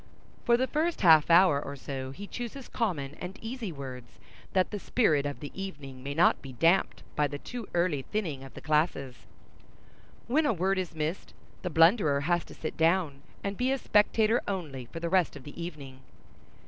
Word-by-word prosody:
For 235 Hz, 0 st, +5 dB
the 255 Hz, -, +2 dB
first 315 Hz, +6 st, -1 dB
half 160 Hz, -5 st, +7 dB
hour 170 Hz, -4 st, +6 dB
or 140 Hz, -, -6 dB
so 135 Hz, -1 st, -5 dB
he 190 Hz, +10 st, -8 dB
chooses 245 Hz, +4 st, -6 dB
common 155 Hz, -, -2 dB
and 185 Hz, +3 st, -6 dB
easy 225 Hz, -3 st, -5 dB
words, 130 Hz, -5 st, -9 dB, 0.4 s
that 185 Hz, -1 st, +2 dB
the 205 Hz, -, -3 dB
spirit 155 Hz, -, +2 dB
of 145 Hz, -, -6 dB
the 145 Hz, -, -6 dB
evening 145 Hz, -9 st, -7 dB
may 140 Hz, +2 st, -5 dB
not 170 Hz, -, +4 dB
be 135 Hz, -2 st, -9 dB
damped 165 Hz, +9 st, +2 dB
by 150 Hz, -, +2 dB
the 145 Hz, 0 st, -5 dB
too 240 Hz, +8 st, -7 dB
early 170 Hz, -5 st, +1 dB
thinning 155 Hz, -6 st, -3 dB
of 135 Hz, -, -12 dB
the -, -, -9 dB
classes. 150 Hz, -4 st, -1 dB, 1.0 s
When 295 Hz, +6 st, +2 dB
a 280 Hz, -, +3 dB
word 190 Hz, +1 st, +1 dB
is 180 Hz, -3 st, -4 dB
missed, 155 Hz, +4 st, -3 dB, 0.3 s
the 180 Hz, -, -3 dB
blunderer 165 Hz, -3 st, +4 dB
has 175 Hz, +3 st, +1 dB
to -, -, -13 dB
sit 155 Hz, -, -5 dB
down, 160 Hz, -4 st, +2 dB, 0.2 s
and 200 Hz, 0 st, -2 dB
be 255 Hz, +1 st, +1 dB
a 270 Hz, -, +1 dB
spectator 220 Hz, 0 st, +3 dB
only 150 Hz, -11 st, -4 dB
for 165 Hz, -, -7 dB
the 170 Hz, -, -2 dB
rest 180 Hz, -2 st, +2 dB
of 140 Hz, -, -10 dB
the 150 Hz, +3 st, -9 dB
evening. 140 Hz, -6 st, -8 dB
170 Hz, 190 wpm, -29 LUFS, 140-200 Hz, 1.0 s, half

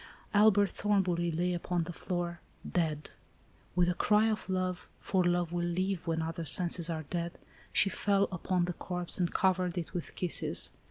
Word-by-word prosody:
Albert 205 Hz, -1 st, +5 dB
Thornbury 185 Hz, -4 st, +1 dB
lay 175 Hz, +3 st, 0 dB
upon 175 Hz, 0 st, -1 dB
the 175 Hz, +2 st, -6 dB
floor, 175 Hz, 0 st, -3 dB, 0.3 s
dead. 155 Hz, -4 st, -1 dB, 0.6 s
With 180 Hz, -1 st, +4 dB
a 180 Hz, -, +2 dB
cry 210 Hz, +4 st, +3 dB
of 215 Hz, -2 st, -4 dB
love, 185 Hz, -1 st, -1 dB
for 190 Hz, -2 st, +1 dB
love 175 Hz, -1 st, +1 dB
will 175 Hz, 0 st, -1 dB
live 185 Hz, +1 st, -1 dB
when 165 Hz, -1 st, 0 dB
other 165 Hz, +1 st, -4 dB
senses 170 Hz, +2 st, +1 dB
are 160 Hz, -1 st, -2 dB
dead, 170 Hz, +3 st, -4 dB, 0.3 s
she -, -, +4 dB
fell 200 Hz, 0 st, +2 dB
upon 180 Hz, 0 st, 0 dB
the 180 Hz, -, -3 dB
corpse 180 Hz, +1 st, -2 dB
and 175 Hz, -2 st, +1 dB
covered 185 Hz, -2 st, +1 dB
it 170 Hz, 0 st, -4 dB
with 175 Hz, -3 st, -5 dB
kisses. 180 Hz, -2 st, +1 dB
175 Hz, 170 wpm, -31 LUFS, 170-185 Hz, 0.6 s, Albert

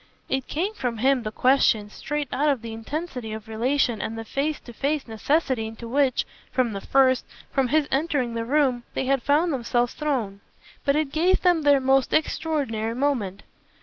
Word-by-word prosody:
It 265 Hz, -1 st, -1 dB
came 370 Hz, +8 st, -2 dB
from 245 Hz, -, -3 dB
him, 260 Hz, +3 st, +3 dB
the 215 Hz, -2 st, -4 dB
question, 225 Hz, -5 st, +3 dB
straight 295 Hz, +4 st, -3 dB
out 290 Hz, +4 st, +2 dB
of 265 Hz, -5 st, 0 dB
the 230 Hz, -1 st, -6 dB
intensity 250 Hz, -1 st, -5 dB
of 220 Hz, 0 st, -7 dB
relation 235 Hz, +1 st, 0 dB
and 225 Hz, -, -4 dB
the 225 Hz, -, -6 dB
face 290 Hz, +6 st, -1 dB
to 240 Hz, -, -12 dB
face 280 Hz, +4 st, -1 dB
necessity 240 Hz, +1 st, 0 dB
into 225 Hz, +1 st, -8 dB
which, 270 Hz, +1 st, +2 dB, 0.3 s
from 250 Hz, -4 st, +1 dB
the 195 Hz, -, -5 dB
first, 260 Hz, +1 st, +3 dB, 0.3 s
from 270 Hz, -2 st, +1 dB
his 300 Hz, +2 st, +2 dB
entering 270 Hz, -4 st, 0 dB
the 230 Hz, 0 st, -2 dB
room, 260 Hz, -1 st, +2 dB
they -, -, -1 dB
had 270 Hz, 0 st, +2 dB
found 300 Hz, +5 st, +2 dB
themselves 240 Hz, -1 st, 0 dB
thrown; 245 Hz, -10 st, -2 dB, 0.5 s
but 280 Hz, -1 st, +3 dB
it 305 Hz, -2 st, 0 dB
gave 350 Hz, +5 st, +2 dB
them 350 Hz, -3 st, +4 dB
their 285 Hz, -2 st, +5 dB
most 265 Hz, 0 st, +2 dB
extraordinary 275 Hz, -8 st, 0 dB
moment. 240 Hz, -8 st, -1 dB
265 Hz, 180 wpm, -25 LUFS, 230-290 Hz, 0.5 s, their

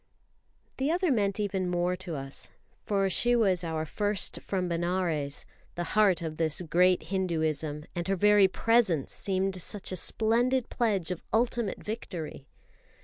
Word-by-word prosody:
The 270 Hz, +2 st, 0 dB
other 350 Hz, 0 st, +1 dB
meant 200 Hz, -4 st, +1 dB
even 195 Hz, -3 st, -1 dB
more 175 Hz, +1 st, 0 dB
to 180 Hz, -3 st, -5 dB
us, 135 Hz, -1 st, -4 dB, 0.3 s
for 195 Hz, -2 st, +1 dB
she 240 Hz, +6 st, +3 dB
was 190 Hz, -7 st, +3 dB
our 160 Hz, -1 st, -2 dB
first 205 Hz, +5 st, -1 dB
from 185 Hz, -2 st, -2 dB
Benares, 170 Hz, -4 st, -1 dB, 0.3 s
the 175 Hz, -, -2 dB
heart 200 Hz, -5 st, +4 dB
of 155 Hz, -1 st, -4 dB
this 160 Hz, +1 st, +1 dB
great 180 Hz, +2 st, +3 dB
Hinduism; 155 Hz, -5 st, -1 dB
and 175 Hz, -1 st, -3 dB
her 195 Hz, -, +1 dB
very 205 Hz, +1 st, +5 dB
presence 200 Hz, -, +1 dB
seemed 190 Hz, -1 st, -1 dB
such 200 Hz, +3 st, -1 dB
a -, -, -2 dB
splendid 235 Hz, +7 st, +1 dB
pledge 200 Hz, -8 st, 0 dB
of 180 Hz, -, -4 dB
ultimate 230 Hz, -2 st, 0 dB
victory. 175 Hz, -, -6 dB
185 Hz, 145 wpm, -29 LUFS, 170-210 Hz, 0.3 s, very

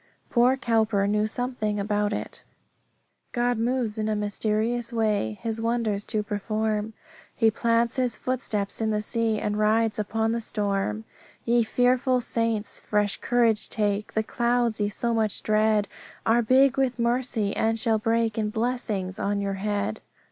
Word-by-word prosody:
Poor 250 Hz, +2 st, +4 dB
Cowper 220 Hz, -5 st, +1 dB
knew 210 Hz, +1 st, +1 dB
something 220 Hz, -3 st, -2 dB
about 205 Hz, 0 st, 0 dB
it -, -, -5 dB, 0.9 s
"God 240 Hz, -1 st, +1 dB
moves 235 Hz, -2 st, -1 dB
in 215 Hz, 0 st, -1 dB
a 215 Hz, -, 0 dB
mysterious 215 Hz, +3 st, -1 dB
way 210 Hz, -, 0 dB
His 225 Hz, 0 st, -2 dB
wonders 225 Hz, -3 st, 0 dB
to 215 Hz, -2 st, -1 dB
perform; 215 Hz, +1 st, -2 dB, 0.4 s
He 225 Hz, -2 st, +3 dB
plants 230 Hz, +2 st, +1 dB
His 250 Hz, -2 st, +1 dB
footsteps 220 Hz, -6 st, -2 dB
in 220 Hz, -, +1 dB
the 210 Hz, -1 st, 0 dB
sea, 225 Hz, 0 st, 0 dB
And 210 Hz, 0 st, -2 dB
rides 215 Hz, +1 st, +2 dB
upon 220 Hz, +2 st, 0 dB
the 230 Hz, 0 st, -1 dB
storm. 195 Hz, -, -2 dB, 0.4 s
"Ye 235 Hz, 0 st, +3 dB
fearful 250 Hz, +2 st, +2 dB
saints, 230 Hz, -2 st, -1 dB
fresh 210 Hz, -1 st, 0 dB
courage 235 Hz, -3 st, +1 dB
take, 210 Hz, -1 st, -1 dB
The 220 Hz, -, +1 dB
clouds 235 Hz, -1 st, 0 dB
ye 205 Hz, -, +1 dB
so 235 Hz, +3 st, -1 dB
much 220 Hz, -3 st, 0 dB
dread 215 Hz, -1 st, +2 dB, 0.4 s
Are 230 Hz, +2 st, +4 dB
big 265 Hz, +3 st, +4 dB
with 255 Hz, -2 st, +1 dB
mercy, 235 Hz, -3 st, 0 dB
and 225 Hz, 0 st, +1 dB
shall 220 Hz, -1 st, +2 dB
break 225 Hz, 0 st, 0 dB
In 210 Hz, -1 st, 0 dB
blessings 215 Hz, -5 st, -2 dB
on 200 Hz, 0 st, 0 dB
your 200 Hz, -1 st, -2 dB
head. 205 Hz, -, -2 dB
220 Hz, 155 wpm, -25 LUFS, 210-235 Hz, 0.9 s, Poor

